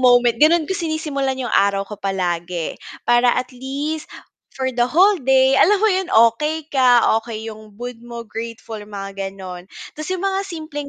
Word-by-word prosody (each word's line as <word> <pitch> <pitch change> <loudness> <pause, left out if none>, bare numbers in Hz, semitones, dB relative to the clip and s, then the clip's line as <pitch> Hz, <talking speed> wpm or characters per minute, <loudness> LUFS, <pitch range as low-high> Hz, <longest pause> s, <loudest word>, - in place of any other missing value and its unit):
moment. 245 -2 +4
Gano'n 320 +1 +5
ko 380 - -3
sinisimulan 310 -6 -2
'yong 255 -2 -4
araw 200 0 +2
ko 210 +1 -10
palagi. 175 -3 -2 0.2
Para 240 +1 +4
at 255 +1 -3
least 280 +5 -4 0.5
for 260 -1 -1
the 240 0 +1
whole 375 +4 +4
day, 265 +1 +4
alam 415 +4 +5
mo - - +6
'yon 375 -1 -1 0.2
okey 305 +5 -3
ka, 250 -3 +5 0.2
okey 220 -1 -7
'yong 215 -2 -10
mood 245 0 -7
mo, 235 -1 -8
grateful 225 -1 -7
mga 195 -1 -6
gano'n. 185 -1 -9 0.2
Tas 310 0 -7
'yong 370 0 -2
mga 390 0 -1
simpleng 310 -4 -6
245 Hz, 170 wpm, -20 LUFS, 215-305 Hz, 0.5 s, mo